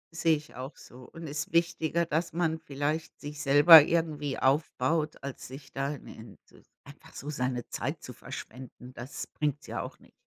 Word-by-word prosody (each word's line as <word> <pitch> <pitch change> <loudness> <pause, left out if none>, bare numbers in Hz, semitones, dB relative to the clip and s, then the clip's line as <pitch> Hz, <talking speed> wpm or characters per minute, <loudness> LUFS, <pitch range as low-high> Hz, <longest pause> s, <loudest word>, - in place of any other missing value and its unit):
Sehe 160 0 +3
ich 150 +1 -13
auch 130 +4 -8
so 125 +1 -13
und 165 0 -9
ist 150 +1 -4
wichtiger, 170 0 +1
dass 165 +1 -1
man 165 -1 0
vielleicht 150 +2 -3
sich 145 +1 -7
selber 150 +3 +10
irgendwie 150 -3 -1
aufbaut, 150 +2 +1
als 140 -1 -7
sich 135 +1 -11
da 135 +1 -1
im 135 - -14
in 110 -2 -12
s - - -21
einfach 140 +1 -15
so 145 - -5
seine 125 -3 -2
Zeit - - -4
zu - - -8
verschwenden, 125 +1 -10
das 125 +3 -7
bringt's 150 -1 -3
ja - - -4
auch - - -8
nicht. - - -22
145 Hz, 180 wpm, -29 LUFS, 135-160 Hz, -, selber